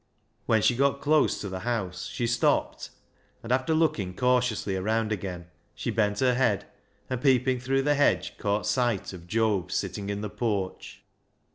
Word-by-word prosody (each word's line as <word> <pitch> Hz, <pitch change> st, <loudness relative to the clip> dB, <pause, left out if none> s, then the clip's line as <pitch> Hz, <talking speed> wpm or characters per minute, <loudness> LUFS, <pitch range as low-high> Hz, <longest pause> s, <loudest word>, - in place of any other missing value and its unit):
When 110 Hz, -2 st, +3 dB
she 120 Hz, -, +4 dB
got 140 Hz, +2 st, +2 dB
close 150 Hz, +1 st, +2 dB
to 100 Hz, -, -4 dB
the 95 Hz, -1 st, -5 dB
house 95 Hz, -5 st, -3 dB
she 120 Hz, -, -3 dB
stopped, 115 Hz, 0 st, 0 dB, 0.5 s
and 115 Hz, -, -5 dB
after 130 Hz, +5 st, +2 dB
looking 105 Hz, -, 0 dB
cautiously 125 Hz, -5 st, +1 dB
around 110 Hz, +3 st, 0 dB
again, 90 Hz, -4 st, -4 dB, 0.3 s
she -, -, -3 dB
bent 105 Hz, -2 st, 0 dB
her 130 Hz, -1 st, +4 dB
head, 125 Hz, 0 st, +1 dB, 0.4 s
and 130 Hz, -1 st, -3 dB
peeping 130 Hz, -1 st, +3 dB
through 135 Hz, +2 st, 0 dB
the 145 Hz, +1 st, +3 dB
hedge, 145 Hz, 0 st, +1 dB
caught 105 Hz, 0 st, 0 dB
sight 120 Hz, -7 st, 0 dB
of 85 Hz, -1 st, -11 dB
Job 105 Hz, -2 st, 0 dB
sitting 100 Hz, -1 st, -3 dB
in 100 Hz, 0 st, -3 dB
the 105 Hz, -, -4 dB
porch. 100 Hz, -6 st, -3 dB
115 Hz, 165 wpm, -27 LUFS, 100-130 Hz, 0.5 s, she